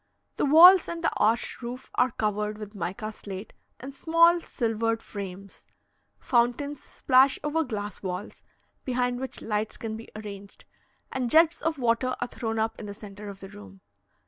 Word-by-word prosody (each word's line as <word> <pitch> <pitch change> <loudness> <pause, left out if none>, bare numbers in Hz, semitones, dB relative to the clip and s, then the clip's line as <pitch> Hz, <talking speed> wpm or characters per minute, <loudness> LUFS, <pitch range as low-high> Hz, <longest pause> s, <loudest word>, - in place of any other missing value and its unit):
The - - +1
walls 350 +5 +9
and 340 0 -5
the - - +2
arched 230 +4 +1
roof 245 +2 -7
are 250 - +3
covered 210 -2 -2
with 210 -1 -9
mica 210 +2 -4
slate 200 -1 -9 0.3
in 260 +3 -7
small 335 +4 +4
silvered 225 -4 -1
frames; 195 -1 -8 0.5
fountains 255 +4 0
splash 265 +1 +3
over 310 +2 0
glass 210 -6 -5
walls, 185 +1 -6 0.4
behind 245 -1 -1
which 260 -1 -6
lights 215 0 -2
can 220 -1 -5
be 225 +1 -10
arranged, 200 -2 -9 0.5
and 255 -2 -2
jets 325 +4 +4
of 320 -1 -1
water 250 0 +1
are 245 - -2
thrown 225 -2 -4
up 220 +1 -1
in 210 - -7
the 205 - -7
centre 205 0 -10
of 195 -1 -10
the 195 - -9
room. 95 - -13
230 Hz, 165 wpm, -27 LUFS, 210-265 Hz, 0.5 s, walls